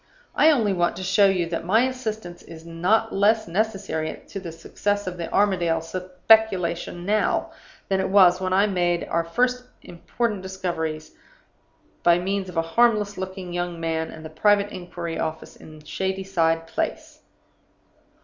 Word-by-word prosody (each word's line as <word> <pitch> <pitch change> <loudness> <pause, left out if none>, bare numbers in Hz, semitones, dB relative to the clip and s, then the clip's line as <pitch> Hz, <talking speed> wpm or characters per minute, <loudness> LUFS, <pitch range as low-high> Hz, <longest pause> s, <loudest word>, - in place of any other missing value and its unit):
I 315 - +5
only 225 -10 +2
want 175 -2 0
to 185 - -6
show 195 +2 +4
you 185 -3 +1
that 165 - -3
my 215 +7 +3
assistance 220 -9 -4
is 165 0 -12
not 185 +7 +1
less 215 +3 +2
necessary 190 -4 -2
to 195 - -5
the 175 -3 -7
success 205 +5 -2
of 180 -1 -5
the 170 - -5
Armadale 175 -5 +2
speculation 180 0 +1
now 210 +2 +1 0.4
than 195 -1 0
it 190 - -1
was 185 -2 +5
when 185 0 -1
I 195 +2 +4
made 175 -4 0
our 170 - 0
first 250 +9 0 0.2
important 205 +4 -3
discoveries, 170 -5 -4 0.9
by 170 0 +5
means 190 +1 -2
of 180 - -10
the 165 - +1
harmless 210 +3 +2
looking 185 -1 -6
young 175 -1 -3
man 160 -1 -2
and 160 0 -10
the 155 - -8
private 205 +4 +2
inquiry 175 -2 -6
office 160 0 -4
in 155 -1 -14
Shadyside 180 -1 -1
Place. 165 - -4
185 Hz, 155 wpm, -24 LUFS, 170-205 Hz, 0.9 s, I